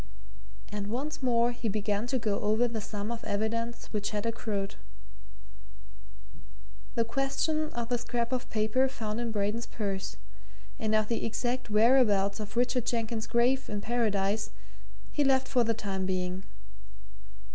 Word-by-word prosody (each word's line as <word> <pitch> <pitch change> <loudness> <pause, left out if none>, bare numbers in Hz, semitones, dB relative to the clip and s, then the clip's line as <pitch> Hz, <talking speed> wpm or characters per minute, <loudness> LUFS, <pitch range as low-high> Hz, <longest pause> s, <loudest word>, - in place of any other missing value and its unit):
And 205 -1 -3
once 275 +8 -3
more 240 -2 +3
he 240 -2 -3
began 210 +1 0
to 260 +1 +1
go 215 -4 0
over 220 +3 +3
the 230 -2 -3
sum 205 +1 -4
of 235 -1 -4
evidence 230 +3 -1
which 205 -1 0
had 210 0 -2
accrued. 215 -4 -2 2.2
The 230 - +2
question 275 +5 0
of 235 -1 -3
the 245 -1 +1
scrap 240 0 -1
of 255 -1 -2
paper 220 +5 +2
found 220 -3 -3
in 235 -1 -1
Braden's 210 +2 -1
purse, 195 -3 -3 0.6
and 220 0 +1
of 215 -1 +3
the 230 - -1
exact 245 +2 -1
whereabouts 210 -3 +4
of 210 +1 -6
Richard 245 -1 +2
Jenkins's 230 -2 -1
grave 245 +4 +2
in 205 - -2
Paradise, 215 -3 +1 0.6
he 295 - +2
left 265 -1 +3
for 250 -3 +3
the 230 0 +1
time 190 -3 -2
being. 185 0 -1
230 Hz, 145 wpm, -30 LUFS, 210-245 Hz, 2.2 s, whereabouts